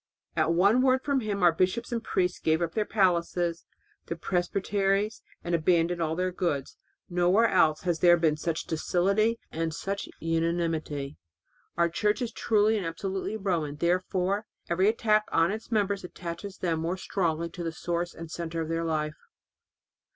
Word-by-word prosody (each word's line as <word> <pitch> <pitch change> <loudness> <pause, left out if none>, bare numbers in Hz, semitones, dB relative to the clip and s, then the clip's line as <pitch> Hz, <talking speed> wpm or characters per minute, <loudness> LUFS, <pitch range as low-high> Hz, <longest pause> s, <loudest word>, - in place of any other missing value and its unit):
At 165 - +2
one 200 +8 +4
word 260 0 +3
from 280 -2 +1
him 205 -5 -2
our 175 - +7
bishops 185 +9 0
and 230 -1 -2
priests 180 -4 0
gave 160 0 +2
up 170 -1 -2
their 215 - 0
palaces 175 -3 +1 0.3
and - - -44
their 170 - -4
presbyteries 195 +4 0 0.2
and 175 - -3
abandoned 170 +1 +2
all 160 -1 0
their 185 +1 0
goods. 170 -7 -2 0.3
Nowhere 180 +6 +3
else 160 -6 +3
has 175 -3 -1
there 175 -1 +6
been 160 -3 +2
such 160 +1 -3
docility 195 +7 +1
and 160 -1 -2
such 195 +3 -4
unanimity. 165 -3 -1 0.6
Our 170 - +4
Church 210 +6 0
is 235 - -3
truly 215 -1 +2
and 195 - -3
absolutely 190 +5 -3
Roman; 170 -8 -1
therefore 185 +5 0 0.2
every 185 +3 +3
attack 215 -1 +2
on 165 +3 +3
its 220 +3 -6
members 200 -3 +1
attaches 180 +2 -7
them 165 -3 -1
more 170 +3 -2
strongly 170 -3 -1
to 175 +1 -6
the 165 - -2
source 175 +1 -3
and 165 -1 -8
centre 165 -1 -3
of 160 - -4
their 165 0 -1
life. 155 -2 -3
175 Hz, 165 wpm, -28 LUFS, 165-200 Hz, 0.6 s, our